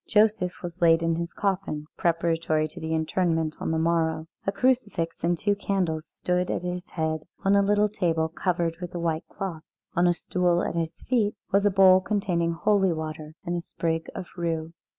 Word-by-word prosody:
Joseph 210 -5 +2
was 175 0 -7
laid 165 -1 +5
in 165 0 +2
his 170 0 -3
coffin 190 -7 -2
preparatory 165 -2 +1
to 175 - -10
the 160 -1 -4
interment 160 -1 0
on - - -2
the 160 - +1
morrow. 160 -1 +1 0.2
A - - +3
crucifix 205 -7 0
and 175 +1 +2
two 205 +4 +1
candles 180 -6 -1
stood 180 +3 -1
at - - -1
his 180 0 -3
head 160 -1 -2 0.2
on 195 +1 +5
a 200 - +5
little 205 +1 +3
table 165 -6 0
covered 170 0 -1
with 180 0 -6
a - - -2
white 165 -1 -1
cloth. 180 -5 -5 0.3
On 175 +1 +4
a 175 - +4
stool 175 0 +1
at - - -2
his 165 -1 -3
feet 220 -5 +1 0.2
was 200 +1 +4
a - - +5
bowl 190 -1 +6
containing 185 -5 0
holy 195 +2 +2
water 155 -1 -5
and 175 - -1
a 175 - -2
sprig 165 -1 -2
of 185 - -4
rue. 165 -2 -2
170 Hz, 190 wpm, -26 LUFS, 165-190 Hz, 0.3 s, bowl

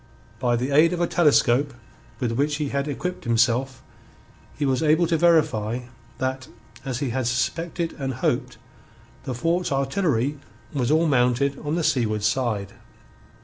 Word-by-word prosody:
By 120 -1 +1
the 125 +4 -2
aid 160 +5 +5
of 175 - -3
a - - +3
telescope 145 -5 +3 0.4
with 120 - -1
which 145 +5 0
he 150 -2 -2
had 140 +1 -2
equipped 180 +6 -4
himself 120 +2 +1 0.7
he 145 - 0
was 130 0 +1
able 160 +2 +3
to 165 0 +1
verify 140 -9 +2 0.4
that, 130 0 -3 0.4
as 130 0 -4
he 135 -4 -1
had 130 -1 -1
suspected 165 +7 -2
and 135 -2 -3
hoped, 125 - -1 0.7
the 130 - -3
fort's 170 +7 0
artillery 140 - 0 0.3
was 130 -4 0
all 160 +2 +3
mounted 135 0 +2
on 150 +1 -3
the 170 - -1
seaward 110 -7 0
side. 105 -3 -1
135 Hz, 150 wpm, -24 LUFS, 120-155 Hz, 0.7 s, aid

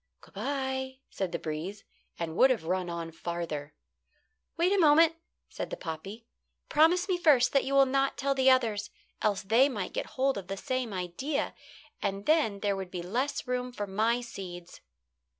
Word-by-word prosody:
"Good - - -19
bye," 265 -1 -3
said 190 -3 -3
the 170 - -1
breeze, 165 +6 -5 0.3
and 165 -1 -4
would 260 - +6
have 245 -9 +1
run 180 +1 -1
on 170 -1 -4
farther. 165 -3 -5 0.8
"Wait 350 +4 +3
a 400 - +3
moment," 320 0 +6 0.3
said - - -6
the - - -5
poppy. 195 +8 -7 0.4
"Promise 345 +5 +4
me 365 -2 0
first 280 -8 +5
that 275 - +3
you 275 - -1
will 275 0 +7
not 270 +1 +1
tell 275 0 +1
the 265 -1 +4
others, 225 -5 +2 0.3
else 205 -2 +1
they 230 +8 +4
might 205 -8 -4
get - - -2
hold 265 -4 +2
of 185 - -10
the 195 - -4
same 255 +1 -2
idea, 190 - -2 0.5
and 195 +1 -2
then 290 -11 +2
there 205 -1 +1
would 190 -1 -5
be 180 -1 -5
less 255 +10 -2
room 250 0 -2
for 210 -4 -4
my 220 +5 +1
seeds." 180 -6 -9
230 Hz, 180 wpm, -29 LUFS, 185-275 Hz, 0.8 s, will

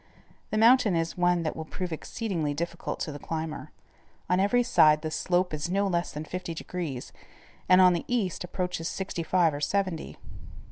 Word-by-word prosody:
The 215 - -1
mountain 230 -3 +5
is 165 0 -1
one 175 -1 +2
that 155 - -2
will 160 - -5
prove 175 +2 -5
exceedingly 160 -4 -3
difficult 170 +2 -4
to 155 - -2
the 145 - -7
climber. 160 0 -5 0.6
On 180 - +3
every 245 +6 +3
side 155 -10 +5
the 155 - -3
slope 180 +2 0
is 155 +2 -3
no 200 +2 +1
less 175 -2 -1
than 150 +1 -6
fifty 180 0 -5
degrees, 160 -7 -5 0.6
and 185 0 +7
on 180 -1 +7
the 170 - -2
east, 220 -9 -1
approaches 180 -2 -3
sixty 190 -3 -4
five 165 -1 +2
or 145 - -5
seventy. 185 0 -1
175 Hz, 180 wpm, -27 LUFS, 160-185 Hz, 0.6 s, and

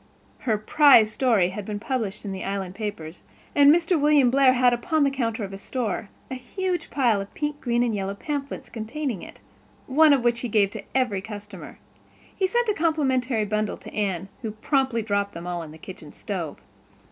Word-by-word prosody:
Her 215 - +3
prize 225 -1 +5
story 220 -7 +2
had 200 +2 -6
been 205 +1 -5
published 220 -4 -3
in 200 - -4
the 190 - -5
Island 195 -2 -3
papers; 190 -6 -6 0.3
and 285 0 +7
Mr. 335 0 +2
William 290 -4 +4
Blair 265 -1 +5
had, 250 -1 +4
upon 290 +6 +1
the 275 - +2
counter 230 -4 -2
of 195 - -5
his 195 0 -8
store, 225 -5 -3 0.2
a - - -2
huge 355 +8 -3
pile 235 -7 +2
of 195 - -9
pink, 295 0 -3
green 240 -1 +1
and 235 -2 0
yellow 195 -1 -3
pamphlets, 280 +2 -5
containing 235 - -4
it, - - -12 0.5
one 305 +3 +5
of 275 -4 +3
which 240 -1 +2
he 245 - -3
gave 205 -2 +3
to 215 -2 -7
every 245 -7 +1
customer. 210 -1 -9 0.6
He 380 - +1
sent 475 +4 +1
a 425 - +2
complimentary 265 - +1
bundle 215 0 -1
to - - -12
Anne, 195 -3 -2
who 220 -3 -4
promptly 260 0 0
dropped 200 -1 -1
them 170 +1 -7
all 175 -1 -3
in 160 - -8
the 155 - -12
kitchen 160 -3 -11
stove. 175 -7 -5
230 Hz, 195 wpm, -25 LUFS, 200-275 Hz, 0.6 s, and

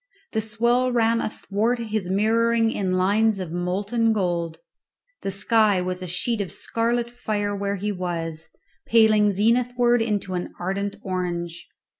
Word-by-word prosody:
The 220 - 0
swell 235 +4 +1
ran 230 -1 +2
athwart 215 +3 -1
his 215 -5 -3
mirroring 225 +3 +2
in 190 -4 -1
lines 205 +4 +2
of 185 -4 -5
molten 200 +6 0
gold; 170 -5 -1 0.6
the - - -3
sky 205 0 +3
was 180 0 -3
a 185 - -5
sheet 215 +5 -1
of 190 - -4
scarlet 235 +1 -1
fire 205 -4 -2
where 200 0 -2
he 205 +2 -2
was, 165 -4 -4 0.4
paling 215 -2 +5
zenithwards 240 +3 +2
into 205 -4 -2
an 180 -1 -4
ardent 200 +3 -2
orange. 175 -2 -3
205 Hz, 140 wpm, -24 LUFS, 185-230 Hz, 0.6 s, paling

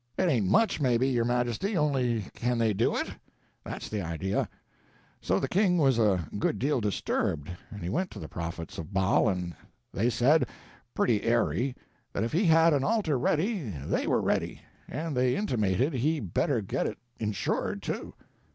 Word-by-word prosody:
It 185 - +2
ain't 115 - +2
much, 190 - +3
maybe, 125 -1 +3
your 120 -3 +1
majesty, 120 - 0
only 130 -7 +1
can 120 0 -1
they 115 -2 +2
do 110 +4 +1
it? - - -1 0.6
That's - - -6
the 105 -2 -3
idea.' 85 +3 -2 0.7
So 95 +2 +1
the 135 - -1
king 180 +3 +3
was 135 -7 +3
a 95 -7 +2
good 105 - +1
deal 135 +2 +1
disturbed, 95 -6 -1 0.2
and 105 -4 -8
he 85 - -2
went 180 - -1
to - - -9
the 80 - -6
prophets 85 0 -6
of 80 +3 -7
Baal, 95 +3 +3
and 90 -3 -3 0.4
they 115 +5 +2
said, 125 +4 +3 0.5
pretty 110 -4 +2
airy, 120 +3 +1 0.4
that 100 - -1
if 115 - -2
he 180 +6 +2
had 165 0 +6
an 140 -2 +2
altar 195 - +1
ready, 190 - +1
they 70 -7 -2
were - - +2
ready; - - -1 0.3
and 155 +1 -4
they 125 0 +2
intimated 125 - +1
he 150 +5 +1
better 95 -9 0
get - - -1
it - - -5 0.2
insured, 105 -2 -2
too. - - -4
120 Hz, 175 wpm, -28 LUFS, 100-150 Hz, 0.7 s, had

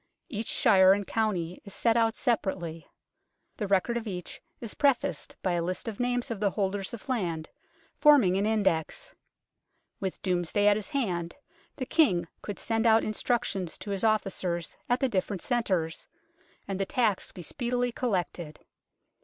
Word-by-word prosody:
Each 225 -5 -4
shire 190 -2 +6
and 205 0 -1
county 185 -7 -1
is 200 - -9
set 230 -1 +2
out 225 -1 +3
separately. 175 -8 -1 0.7
The 210 - -2
record 200 +5 +2
of 230 -1 -5
each 180 -3 -5 0.2
is 230 -3 -6
prefaced 255 - +1
by 185 - +1
a 175 -1 +1
list 180 +5 -3
of 220 -3 -5
names 245 -1 0
of 225 - -3
the 205 -1 +2
holders 195 +1 -1
of 230 - -14
land, 175 -11 -2 0.5
forming 280 - +6
an 200 +2 +1
index. 220 - 0 0.9
With 190 -2 -3
Domesday 180 +2 +1
at 205 0 +6
his 210 -1 -4
hand, 180 - -2 0.4
the 255 - -4
King 185 - +3
could 205 - -5
send 225 0 0
out 225 0 +5
instructions 215 -5 -1
to 205 - -6
his 195 -1 -2
officers 190 -6 0
at 245 +3 +2
the 265 - +3
different 195 -4 -2
centres, 185 -10 -1 0.6
and 195 -1 -3
the 195 - +1
tax 220 -6 +1
be 180 - -9
speedily 245 - -1
collected. 180 -9 -2
205 Hz, 160 wpm, -28 LUFS, 180-235 Hz, 0.9 s, shire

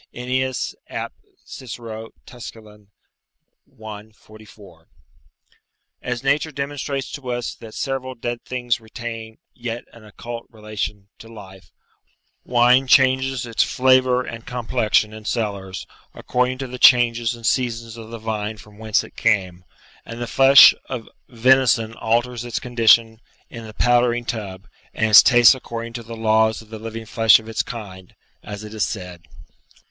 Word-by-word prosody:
Ennius, 130 +1 -2 0.2
ap. - - -5 0.3
Cicero, 115 -3 -8 0.2
Tusc. 120 -2 -10
i. 105 0 -15
44.] 105 -7 -17 1.1
As 125 0 -4
nature 145 +3 +1
demonstrates 140 -1 -4
to 135 -4 -7
us 120 -1 -3
that 110 -2 -13
several 130 -1 -4
dead 120 0 -5
things 120 -2 -2
retain 115 0 -8 0.2
yet 120 -1 -6
an 115 - -15
occult 115 +2 -9
relation 105 -2 -6
to 115 - -12
life; 95 -4 -13 0.7
wine 125 +2 +3
changes 130 -1 +3
its 115 -1 0
flavour 130 -1 +3
and 115 -1 -9
complexion 110 -3 0
in 110 0 -10
cellars, 100 -5 -3 0.3
according 125 +1 -1
to 135 - -5
the 125 0 -8
changes 120 -1 +5
and 115 -1 -10
seasons 115 -2 -1
of 115 -1 -10
the 115 - -7
vine 110 -1 -4
from 105 0 -16
whence 110 -1 +1
it - - -14
came; 95 -3 0 0.4
and 115 +1 -9
the 120 - -3
flesh 135 +3 +8 0.2
of 120 -4 -5 0.2
venison 120 -2 +3
alters 120 +2 -1
its 120 -1 -3
condition 115 -2 +3 0.3
in 115 -1 -9
the 110 - -11
powdering 120 0 +2
tub, 100 -4 -6 0.3
and 110 0 0
its 100 -2 +11
taste 120 0 +6
according 115 -2 -7
to 120 - -6
the 115 0 -9
laws 110 0 +2
of 110 - -15
the 110 - -7
living 115 0 -7
flesh 110 0 +5
of 110 - -14
its 115 - -1
kind, 95 -6 -9 0.3
as 105 0 -8
it 105 0 -9
is 110 - -1
said. 90 -6 -5
115 Hz, 145 wpm, -21 LUFS, 110-125 Hz, 1.1 s, its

